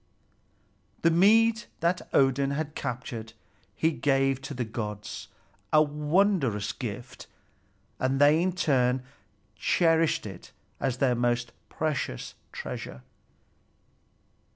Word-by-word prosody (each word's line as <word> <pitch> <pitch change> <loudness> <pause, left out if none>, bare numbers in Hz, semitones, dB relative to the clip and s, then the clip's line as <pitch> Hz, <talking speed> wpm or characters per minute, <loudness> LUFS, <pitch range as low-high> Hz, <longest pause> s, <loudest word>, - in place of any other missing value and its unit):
The 165 - +5
mead 225 +6 +4
that 170 +2 0
Odin 135 0 +3
had 150 +1 -3
captured 120 -4 -5 0.4
he 160 - +2
gave 135 -3 +1
to 140 +1 -6
the 120 -1 -2
gods, 105 -2 -5 0.4
a 155 0 +6
wondrous 150 - +1
gift; - - -7 0.7
and 130 +1 0
they 150 +3 +6
in 185 +1 +1
turn 130 -7 +2 0.5
cherished 165 -5 +2
it 95 -4 -10 0.3
as 130 -2 -1
their 130 -2 +3
most 120 0 0 0.2
precious 145 - -3 0.2
treasure. 65 - -7
135 Hz, 105 wpm, -28 LUFS, 125-160 Hz, 0.7 s, a